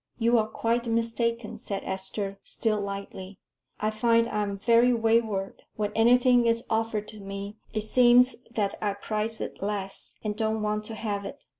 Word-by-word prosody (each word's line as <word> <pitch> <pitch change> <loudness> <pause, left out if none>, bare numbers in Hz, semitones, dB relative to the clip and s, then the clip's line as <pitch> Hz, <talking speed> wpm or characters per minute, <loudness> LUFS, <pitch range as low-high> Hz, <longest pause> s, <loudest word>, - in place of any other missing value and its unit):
"You 235 0 +3
are 215 - 0
quite 235 +2 -1
mistaken," 230 0 -1
said 200 -1 -4
Esther, 195 +1 -2
still 215 -2 -1
lightly. 195 -1 -6 0.4
"I 215 +1 0
find 230 +1 +3
I 210 -2 -1
am 200 -1 -2
very 235 +4 +4
wayward. 225 -4 0
When 210 -1 -2
anything 245 +1 +5
is 230 0 +1
offered 220 -1 0
to 215 - -10
me, 200 +1 -7
it 215 - -2
seems 245 +3 +5
that 210 -4 -2
I 205 -2 0
prize 215 +2 -1
it - - -6
less, 195 -1 -3
and 210 -1 -2
don't 220 0 -1
want 210 0 -1
to 225 - -4
have 205 -2 -3
it." - - -9
215 Hz, 170 wpm, -27 LUFS, 205-230 Hz, 0.4 s, anything